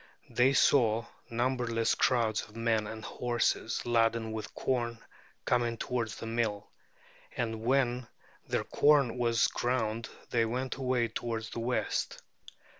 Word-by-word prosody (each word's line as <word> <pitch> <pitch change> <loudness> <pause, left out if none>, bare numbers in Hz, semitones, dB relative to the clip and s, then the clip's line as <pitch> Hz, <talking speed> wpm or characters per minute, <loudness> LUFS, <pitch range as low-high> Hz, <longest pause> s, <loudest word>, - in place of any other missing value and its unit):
They 130 +3 +4
saw 115 -5 +4 0.2
numberless 120 -1 +1
crowds 115 -4 +2
of 105 - -13
men 115 -2 +1
and 110 0 -7
horses 120 -1 -1
laden 115 -1 +2
with 110 -1 -6
corn 120 -3 -1 0.5
coming 120 -1 +1
towards 115 -2 -2
the - - -7
mill; 115 -3 -2 0.7
and 115 -2 -2
when 125 0 +1 0.4
their - - 0
corn 140 -5 +3
was 115 -2 +3
ground 115 -2 -1 0.2
they 115 -1 +3
went 125 +3 -2
away 125 -3 +1
towards 115 -1 -4
the - - -4
west. 120 +2 -1
115 Hz, 125 wpm, -31 LUFS, 115-125 Hz, 0.7 s, They